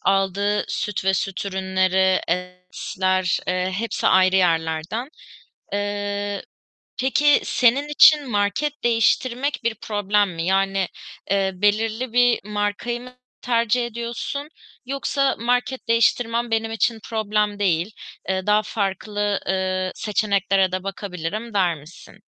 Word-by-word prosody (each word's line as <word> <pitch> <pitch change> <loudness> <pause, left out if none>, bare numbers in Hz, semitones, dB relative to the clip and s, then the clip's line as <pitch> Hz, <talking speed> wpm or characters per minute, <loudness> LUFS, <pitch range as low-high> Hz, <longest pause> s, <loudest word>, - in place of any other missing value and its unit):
aldığı 195 +1 +1
süt 205 -1 -3
ve 190 0 +3
süt 195 +2 -2
ürünleri, 190 0 +1
etler, 180 +1 -1
eee, 185 +1 0
hepsi 230 +3 -2
ayrı 185 0 +5
yerlerden. 165 - 0 0.6
Eee, 205 0 -2 0.6
peki 285 +3 +4
senin 260 +4 +2
için 295 -2 +6
market 210 +8 -1
değiştirmek 240 +4 +1
bir 235 -1 +1
problem 205 -1 +1
mi? 165 0 -3
Yani, 195 0 +1 0.4
eee, 195 -1 +2
belirli 220 +5 0
bir 245 0 +4
markayı 210 +3 -2
mı 250 +1 -12 0.3
tercih 235 0 +1
ediyorsun 235 +5 -5 0.4
yoksa, 275 +1 0
"Market 245 +1 -1
değiştirmem 230 +1 +2
benim 225 0 0
için 225 +1 0
problem 210 -2 0
değil, 185 0 +1 0.4
eee, 190 -1 -1
daha 210 +1 +4
farklı, 205 0 -2
eee, 185 0 -1
seçeneklere 195 -3 +1
de 185 0 -2
bakabilirim." 195 +3 -5
der 180 -4 +2
misin? 150 +4 -14
205 Hz, 115 wpm, -22 LUFS, 190-230 Hz, 0.6 s, için